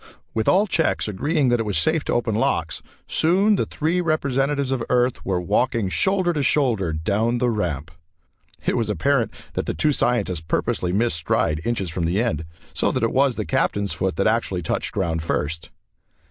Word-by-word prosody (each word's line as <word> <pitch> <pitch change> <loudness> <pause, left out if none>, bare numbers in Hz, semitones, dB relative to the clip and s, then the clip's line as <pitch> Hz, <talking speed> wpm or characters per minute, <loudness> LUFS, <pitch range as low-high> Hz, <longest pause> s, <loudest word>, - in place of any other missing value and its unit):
With 110 -1 -1
all 195 +3 +4
checks 165 - +1
agreeing 140 - 0
that 120 -1 +2
it - - +1
was 100 - 0
safe 160 -1 +2
to - - -1
open 120 -2 0
locks, 80 -8 0 0.3
soon 195 +6 +3
the - - -1
three 165 +4 0
representatives 140 -3 0
of 130 -3 -1
Earth 125 0 +1
were 95 -2 0
walking 105 +3 0
shoulder 185 - +1
to 150 - -1
shoulder 120 - +2
down 100 +9 0
the 120 0 +1
ramp. 85 - -2 0.7
It - - +1
was 115 -3 0
apparent 115 - +1 0.2
that - - -3
the - - -2
two 150 - +2
scientists 120 - 0
purposely 90 +2 -1
missed 105 -1 +1
stride 75 -1 0
inches 100 -7 -1
from 85 0 -2
the 90 +5 +1
end, 80 -10 -1 0.3
so - - +1
that 130 - -1
it 115 - +1
was 135 -1 +3
the - - -3
Captain's 100 -1 0
foot 95 -1 -1
that 100 - 0
actually 110 -5 0
touched - - -2
ground 80 -1 -1
first. 80 0 -3
115 Hz, 190 wpm, -22 LUFS, 90-140 Hz, 0.7 s, all